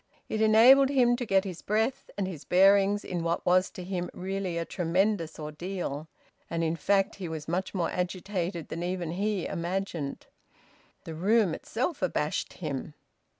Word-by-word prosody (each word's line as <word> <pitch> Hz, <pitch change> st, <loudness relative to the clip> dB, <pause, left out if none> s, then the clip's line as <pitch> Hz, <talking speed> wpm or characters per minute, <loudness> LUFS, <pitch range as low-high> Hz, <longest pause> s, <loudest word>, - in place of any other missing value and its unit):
It 215 Hz, -, -1 dB
enabled 240 Hz, +5 st, +7 dB
him 250 Hz, -3 st, +4 dB
to 245 Hz, -2 st, -4 dB
get 195 Hz, -1 st, +3 dB
his 185 Hz, -4 st, -6 dB
breath 220 Hz, +5 st, -1 dB
and 195 Hz, -2 st, -1 dB
his 165 Hz, -6 st, -7 dB
bearings 195 Hz, +2 st, +4 dB
in 175 Hz, -2 st, -3 dB
what 170 Hz, 0 st, -1 dB
was 185 Hz, +1 st, +4 dB
to 180 Hz, -, -8 dB
him 180 Hz, -1 st, -3 dB
really 190 Hz, -1 st, -3 dB
a 165 Hz, -, -1 dB
tremendous 175 Hz, 0 st, 0 dB
ordeal. 155 Hz, -1 st, -5 dB, 0.4 s
And 165 Hz, 0 st, -1 dB
in 160 Hz, 0 st, 0 dB
fact 195 Hz, +4 st, +1 dB
he 185 Hz, -3 st, -5 dB
was 155 Hz, -2 st, -6 dB
much 185 Hz, +4 st, -2 dB
more 175 Hz, -3 st, 0 dB
agitated 180 Hz, -2 st, -3 dB
than 165 Hz, -, -4 dB
even 175 Hz, -2 st, -2 dB
he 200 Hz, +1 st, -1 dB
imagined. 170 Hz, -4 st, -3 dB, 0.8 s
The 165 Hz, -, -7 dB
room 195 Hz, +2 st, +2 dB
itself 260 Hz, -, -3 dB
abashed -, -, -1 dB
him. -, -, -5 dB
185 Hz, 160 wpm, -28 LUFS, 170-205 Hz, 0.8 s, enabled